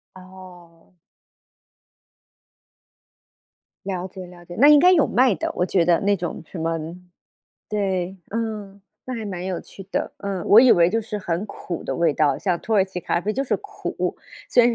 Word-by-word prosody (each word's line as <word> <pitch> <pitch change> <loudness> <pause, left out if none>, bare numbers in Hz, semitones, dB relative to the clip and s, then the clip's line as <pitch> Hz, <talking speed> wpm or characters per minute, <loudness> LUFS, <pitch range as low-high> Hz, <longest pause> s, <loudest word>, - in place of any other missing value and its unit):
哦。 185 -2 -15 2.9
了 185 -2 -3
解 185 0 -9
了 175 -1 -14
解， 175 - -9
那 280 - +6
应 295 -1 +8
该 360 +3 +6
有 320 -6 +5
卖 250 -4 +3
的， - - -3
我 180 - +1
觉 180 -2 +2
得 170 -1 +4
那 200 0 +2
种 175 -2 -5
什 175 - -8
么 165 0 -1 0.9
对， 190 -2 -2
嗯， 210 -3 -4 0.3
那 255 - -4
还 225 -2 -5
蛮 185 -3 -5
有 185 -2 -2
趣 195 - -12
的。 - - -2
嗯， 195 -3 -4
我 215 - +8
以 255 -1 +7
为 170 0 +4
就 225 +3 +1
是 215 -1 -5
很 180 0 -3
苦 175 -4 -6
的 - - -3
味 170 -2 +2
道， 145 -2 +2
像 180 -4 -1
土 225 - -2
耳 195 -2 +5
其 190 -2 -7
咖 170 - 0
啡 210 - -1
就 270 - -1
是 275 - 0
苦， 415 0 -4 0.4
虽 245 - +6
然 240 - +4
190 Hz, 195 characters per minute, -23 LUFS, 175-220 Hz, 2.9 s, 应